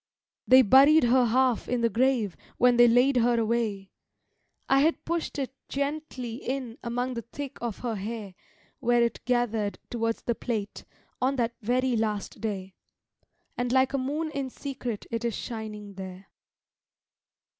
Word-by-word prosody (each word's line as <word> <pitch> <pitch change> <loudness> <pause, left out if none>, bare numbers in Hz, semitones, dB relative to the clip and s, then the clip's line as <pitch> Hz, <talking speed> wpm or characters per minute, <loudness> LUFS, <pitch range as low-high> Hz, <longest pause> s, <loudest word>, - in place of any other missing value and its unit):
They 260 0 +8
buried 275 +7 +7
her 245 +1 +4
half 250 0 +2
in 245 -1 0
the 230 - +4
grave 235 -5 +1 0.2
when 245 0 +5
they 240 0 +8
laid 250 +3 +4
her 240 0 +3
away; 220 -4 -1 0.8
I 270 - +4
had 315 +4 +1
pushed 335 -2 -2
it 265 -2 -3 0.2
gently 280 -4 -3
in 255 -3 -4
among 245 +2 -2
the 235 - -4
thick 275 +4 -8
of 235 -4 -3
her 235 - 0
hair 210 -1 -5 0.5
Where 240 -2 +3
it 235 - -2
gathered 230 -4 0
towards 230 -1 -1
the 235 - 0
plait, 220 -3 -4 0.4
on 265 +2 +2
that 235 -2 0
very 250 +3 +1
last 210 -2 -2
day; 195 -4 -4 0.8
And 245 0 -2
like 260 +1 +3
a 275 - +1
moon 300 +5 -2
in 275 -3 -3
secret 250 -5 -5
it 230 0 -2
is 235 -2 -1
shining 215 -3 -6
there. 190 0 -9
240 Hz, 155 wpm, -27 LUFS, 225-260 Hz, 0.8 s, They